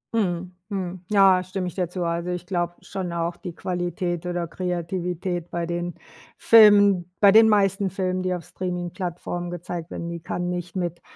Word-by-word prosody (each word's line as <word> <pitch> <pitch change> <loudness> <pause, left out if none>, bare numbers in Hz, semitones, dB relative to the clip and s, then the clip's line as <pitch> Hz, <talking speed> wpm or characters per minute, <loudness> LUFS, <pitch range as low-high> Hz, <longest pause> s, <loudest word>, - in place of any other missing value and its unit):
Mhm. 180 -3 -1
Mhm. 185 -3 -4
Ja, 195 -3 +6
stimme 185 0 -4
ich 175 - -5
dir 180 -3 -1
zu. 180 -1 -3
Also, 170 +1 -2
ich 180 0 -3
glaube 175 -2 -1
schon 185 -3 -5
auch 170 0 -2
die 175 -2 -8
Qualität 175 -1 -3
oder 175 -1 -2
Kreativität 175 0 -3
bei 170 0 -2
den 175 +1 -3 0.4
Filmen 205 -5 +6
bei 200 -1 +7
den 220 +1 +7
meisten 195 -2 +2
Filmen, 185 0 -2
die 185 0 0
auf 175 - -7
Streaming-Plattformen 175 -1 -4
gezeigt 175 -1 -6
werden, 170 - -5
die 170 0 -5
kann 175 +2 -3
nicht 180 0 -4
mit 175 -2 -3
180 Hz, 170 wpm, -24 LUFS, 175-185 Hz, 0.4 s, bei